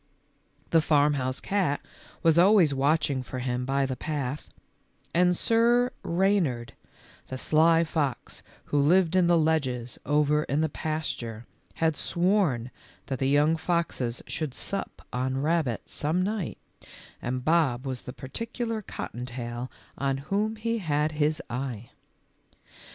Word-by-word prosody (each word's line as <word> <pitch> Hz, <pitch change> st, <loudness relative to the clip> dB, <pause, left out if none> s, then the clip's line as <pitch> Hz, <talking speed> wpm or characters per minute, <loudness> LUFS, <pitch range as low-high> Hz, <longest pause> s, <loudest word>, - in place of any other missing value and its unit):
The 165 Hz, -, +5 dB
farmhouse 145 Hz, -4 st, +2 dB
cat 185 Hz, -8 st, 0 dB, 0.4 s
was 165 Hz, 0 st, +5 dB
always 185 Hz, -5 st, +6 dB
watching 140 Hz, 0 st, +1 dB
for 130 Hz, +1 st, -7 dB
him 125 Hz, 0 st, -2 dB
by 135 Hz, +1 st, +1 dB
the 130 Hz, -1 st, -3 dB
path, 145 Hz, -1 st, -4 dB, 0.6 s
and 180 Hz, 0 st, +3 dB
Sir 240 Hz, +2 st, +3 dB
Reynard, 170 Hz, -, +1 dB, 0.5 s
the 130 Hz, -, -5 dB
sly 165 Hz, +4 st, +4 dB
fox 150 Hz, -5 st, -2 dB, 0.2 s
who 145 Hz, -, +1 dB
lived 175 Hz, +3 st, +4 dB
in 180 Hz, -2 st, +4 dB
the 175 Hz, -1 st, +5 dB
ledges 130 Hz, -7 st, 0 dB
over 150 Hz, 0 st, +2 dB
in 145 Hz, +3 st, 0 dB
the 160 Hz, -, +1 dB
pasture, 140 Hz, -8 st, -4 dB, 0.3 s
had 160 Hz, -1 st, +1 dB
sworn 170 Hz, -, +1 dB, 0.3 s
that 135 Hz, -2 st, -4 dB
the 135 Hz, -, +1 dB
young 145 Hz, +3 st, +4 dB
foxes 160 Hz, -8 st, -1 dB
should 150 Hz, -5 st, -4 dB
sup 200 Hz, -, -5 dB
on 130 Hz, +1 st, -1 dB
rabbit 155 Hz, -8 st, 0 dB
some 160 Hz, +5 st, 0 dB
night, 205 Hz, -3 st, -2 dB, 0.6 s
and 125 Hz, +1 st, -3 dB
Bob 150 Hz, -6 st, +2 dB
was 130 Hz, -2 st, -4 dB
the -, -, -7 dB
particular 225 Hz, -, -4 dB
cotton 125 Hz, -, -6 dB
tail 120 Hz, 0 st, -5 dB, 0.3 s
on 135 Hz, -1 st, 0 dB
whom 215 Hz, +2 st, +1 dB
he 230 Hz, +1 st, -2 dB
had 150 Hz, -4 st, 0 dB
his 150 Hz, 0 st, 0 dB
eye. 120 Hz, -3 st, -5 dB
150 Hz, 135 wpm, -27 LUFS, 130-170 Hz, 0.6 s, always